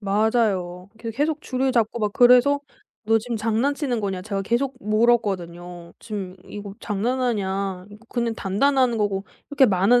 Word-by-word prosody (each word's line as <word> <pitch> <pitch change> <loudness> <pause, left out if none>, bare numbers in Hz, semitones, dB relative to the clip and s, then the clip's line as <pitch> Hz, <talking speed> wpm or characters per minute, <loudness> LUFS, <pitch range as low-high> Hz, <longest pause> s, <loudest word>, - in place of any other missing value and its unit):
맞아요. 200 -3 0
이렇게 225 +1 -6
계속 300 +1 0
줄을 260 +1 -1
잡고 230 -1 +1
막 210 -1 0
그래서 250 +4 +5 0.4
"너 225 +1 +3
지금 235 +1 -4
장난치는 240 +3 0
거냐?" 195 -3 -3
제가 200 -1 -3
계속 255 +5 0
물었거든요. 185 -6 0
"지금 195 -4 -6
이거 205 -1 -8
장난하냐? 200 -4 -1
이거 210 +3 -15
그냥 235 -2 -1
단단한 250 +5 +2
거고. 200 -1 -1 0.3
이렇게 280 -2 +5
많은 205 +5 +4
220 Hz, 335 characters per minute, -23 LUFS, 195-245 Hz, 0.4 s, 그래서